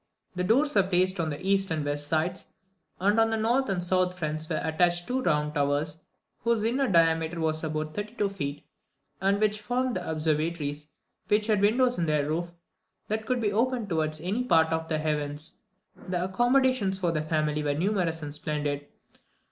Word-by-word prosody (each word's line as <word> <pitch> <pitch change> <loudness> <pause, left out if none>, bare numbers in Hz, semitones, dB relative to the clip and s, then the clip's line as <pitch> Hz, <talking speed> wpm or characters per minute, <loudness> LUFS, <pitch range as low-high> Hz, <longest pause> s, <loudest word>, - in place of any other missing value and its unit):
The 180 - -1
doors 275 +10 +2
were 200 - +5
placed 185 0 +1
on 160 -2 0
the 145 -1 -4
east 195 0 +2
and 155 -3 -1
west 145 0 -1
sides; 165 +4 -1 0.5
and 200 +3 +3
to 225 - +6
the 225 - 0
north 235 +3 +1
and 180 -2 -1
south 180 0 +1
fronts 155 -1 -2
were 155 - 0
attached 175 +2 +1
two 255 +1 -1
round 150 -6 +1
towers, 145 +2 0 0.4
whose 230 -2 +1
inner 260 +4 +1
diameter 165 -2 +2
was 160 0 0
about 155 -1 -3
thirty 210 +3 -5
two 205 - +1
feet, 145 -7 -5 0.6
and 195 +1 +2
which 215 0 +1
formed 245 +3 -1
the 180 - -5
observatories 155 -1 -1 0.4
which 210 0 +2
had 210 -3 +2
windows 245 +3 +3
in 165 - 0
their 150 -2 +1
roof, 170 +3 -2 0.6
that 220 +1 -2
could 250 -1 +1
be 210 -3 0
opened 235 -1 0
towards 155 -2 -1
any 200 +9 -1
part 160 -8 +3
of 160 0 -2
the 155 - 0
heavens. 150 0 -3 0.5
The 180 -1 -1
accommodations 240 0 +2
for 180 -3 0
the 155 -2 -1
family 155 -1 0
were 145 -1 0
numerous 170 -2 0
and 145 -1 -5
splendid. 145 -1 -3
175 Hz, 185 wpm, -27 LUFS, 155-210 Hz, 0.6 s, to